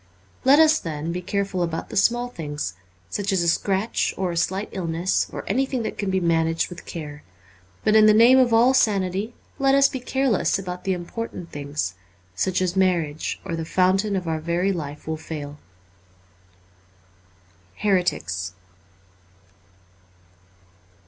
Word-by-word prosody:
Let 270 +2 +6
us, 315 0 +5
then, 160 -1 -4
be 180 +1 -3
careful 195 0 -2
about 165 -1 -3
the - - -7
small 240 +4 +2
things, 150 - -5 0.3
such 200 0 -2
as 190 -3 +2
a - - 0
scratch 195 +5 0
or 185 -2 -1
a - - -4
slight 190 +4 -1
illness, 175 -1 -1
or - - -6
anything 265 -2 0
that - - -5
can 200 - -1
be 190 0 +1
managed 165 -1 +1
with 175 - -10
care. 150 -3 -7 0.6
But 215 - +3
in 215 0 +7
the 215 - +7
name 240 +4 +7
of 250 -2 +4
all 235 +3 +5
sanity, 200 -1 +1 0.2
let 270 0 +4
us 275 0 +6
be 260 - -5
careless 260 -3 +1
about 180 -2 -6
the 190 - +1
important 180 0 -6
things, 145 -9 -3 0.4
such 185 - 0
as 180 0 -1
marriage, 170 -6 0
or 170 -3 -3
the 165 - -3
fountain 190 +4 +2
of 180 -3 -3
our 160 -1 -1
very 170 +4 0
life 150 -4 -6
will 160 0 -2
fail. 150 -2 -7 1.9
' 90 0 -33
Heretics.' 135 - 0
185 Hz, 155 wpm, -23 LUFS, 165-215 Hz, 1.9 s, in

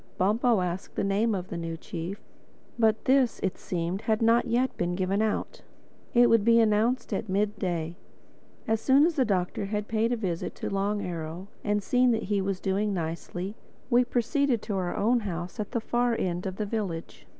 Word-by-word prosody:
Bumpo 215 +3 +3
asked 180 +1 -4
the - - 0
name 205 +3 +1
of 185 -1 -5
the 170 - -4
new 165 -1 -4
chief; 170 +4 -6 0.6
but 220 -1 +2
this, 260 -2 +3
it 190 - -1
seemed, 175 +2 -2
had 220 -1 +1
not 230 +1 +3
yet 245 +3 +1
been 175 0 -1
given 190 +2 0
out. 220 - -2 0.5
It 240 0 +7
would 230 -3 +4
be 230 +1 +5
announced 225 +3 +2
at 220 - -3
mid 205 +2 0
day. 170 -3 -2 0.7
As 225 0 +1
soon 275 +5 +5
as 340 - +2
the 265 -4 +3
Doctor 190 -1 -1
had 210 +1 -3
paid 225 +1 +1
a - - +2
visit 180 -6 -3
to - - -4
Long 200 +1 0
Arrow 170 +2 -5
and 205 -1 0
seen 250 +3 +3
that 220 - -1
he 200 0 0
was 190 -1 -2
doing 200 +1 0
nicely, 175 +3 -4 0.4
we 245 +1 +6
proceeded 245 0 0
to 210 - -3
our 180 -2 -2
own 240 +4 +3
house 175 -4 -5
at 210 - -2
the 235 - -1
far 240 +1 +1
end 180 0 -2
of 190 - -4
the 210 - -2
village. 200 -6 -4
205 Hz, 195 wpm, -28 LUFS, 185-230 Hz, 0.7 s, It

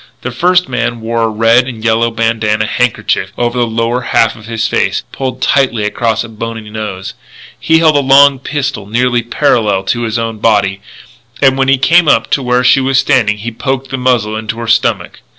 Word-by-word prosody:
The 130 - -4
first 180 +8 +1
man 120 - -2
wore 115 +1 -2
a 115 - +2
red 115 +3 +2
and 115 -4 -8
yellow 115 +1 +2
bandanna 115 -2 -1
handkerchief 125 +1 -1
over 120 +1 -1
the 120 - +1
lower 115 +2 -1
half 115 -2 +1
of 110 -2 -14
his 115 -1 -2
face, - - -1
pulled 130 -1 -4
tightly 130 -6 +1
across 110 +2 -1
a - - -8
bony 115 0 -7
nose. 100 -3 -6 0.5
He 160 - +2
held 160 -2 +3
a - - +4
long 140 0 +5
pistol 140 -6 -4
nearly 120 +2 0
parallel 110 -4 0
to 120 +5 -2
his 115 -1 -2
own 115 -2 -4
body; 100 -3 +1 0.6
and 135 -1 +3
when 135 0 0
he 135 0 +3
came 165 +5 +3
up 115 -5 +2
to 140 - +1
where 125 0 0
she 135 +2 +4
was 135 0 +1
standing 125 -6 +2
he 115 +3 -6
poked 135 +3 -4
the 135 - -2
muzzle 120 -4 0
into 110 +1 -5
her 115 0 -6
stomach. 115 - 0
115 Hz, 200 wpm, -12 LUFS, 110-130 Hz, 0.6 s, long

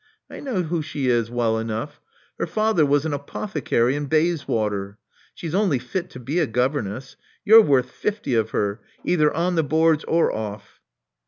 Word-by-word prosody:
I - - -8
know 235 -10 -2
who 165 0 -2
she 145 -4 -2
is 120 -2 +1
well 115 -2 0
enough: 115 +5 -5 0.4
her - - -1
father 215 -8 +2
was 145 +2 +2
an 155 - -1
apothecary 140 - -1
in 145 0 -3
Bayswater. 115 - 0 0.4
She's 165 -2 -6
only 190 -7 +2
fit 180 +8 -4
to 130 - -10
be 140 +8 -2
a 160 - +2
governess. 130 0 -2 0.3
You're 220 +2 +9
worth 130 - +2
fifty 205 - -3
of 110 -2 +1
her, 100 0 -2 0.2
either 150 -4 +3
on 175 +3 0
the 165 -2 +2
boards 160 +1 +2
or 165 0 +2
off." 105 -2 -6
145 Hz, 170 wpm, -23 LUFS, 115-165 Hz, 0.4 s, You're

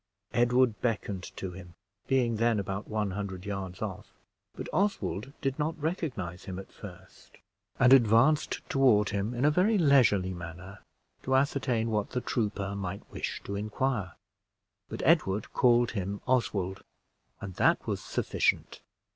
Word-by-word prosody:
Edward 120 -3 +3
beckoned 105 -5 -2
to 95 - -4
him, 90 -2 -11 0.3
being 125 -4 +2
then 115 -1 +2
about 100 +1 -4
one 105 -2 -1
hundred 95 -1 -5
yards 95 -1 -5
off; 100 -4 -5 0.5
but - - -6
Oswald 185 - -1
did 135 +1 -2
not 160 +2 -1
recognize 130 - -3
him 95 -1 -6
at 95 - -9
first, 95 -2 -13 0.4
and 125 +2 +7
advanced 125 +5 +4
toward 120 -7 +4
him 105 +4 -2
in 125 +4 +1
a 150 - +5
very 195 +7 +3
leisurely 125 - +4
manner, 90 +3 -9 0.4
to 130 - 0
ascertain 130 -4 +1
what 105 -2 0
the 125 - -2
trooper 100 -5 -2
might 100 0 -5
wish - - -4
to 100 - -5
inquire. 105 -1 -2 0.8
But - - -5
Edward 95 +2 +2
called 120 -1 +4
him 100 -1 -4
Oswald, 100 -7 0 0.6
and 95 - -7
that - - +3
was - - -2
sufficient. - - -1
105 Hz, 145 wpm, -29 LUFS, 95-130 Hz, 0.8 s, and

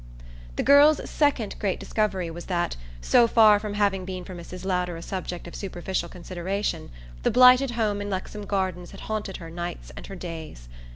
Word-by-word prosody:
The - - -1
girl's 290 +2 +6
second 275 -8 +1
great 200 -3 -1
discovery 190 -6 -1
was 170 +1 -8
that, 175 - -1 0.3
so 235 - +5
far 215 -3 +6
from 205 -1 -5
having 200 -2 +1
been 185 -1 -5
for 185 - -9
Mrs. 180 +1 -9
Lowder 180 -2 -1
a - - -8
subject 180 -2 -5
of 170 - -10
superficial 185 -2 -3
consideration, 185 +3 -4 0.3
the - - +2
blighted 255 +1 +7
home 210 -3 0
in 205 - -4
Lexham 200 +2 -5
Gardens 185 -3 -2
had - - -11
haunted 215 -3 -4
her 165 -2 -9
nights 170 - -6
and - - -9
her - - -8
days. 160 - -8
190 Hz, 180 wpm, -25 LUFS, 175-210 Hz, 0.3 s, blighted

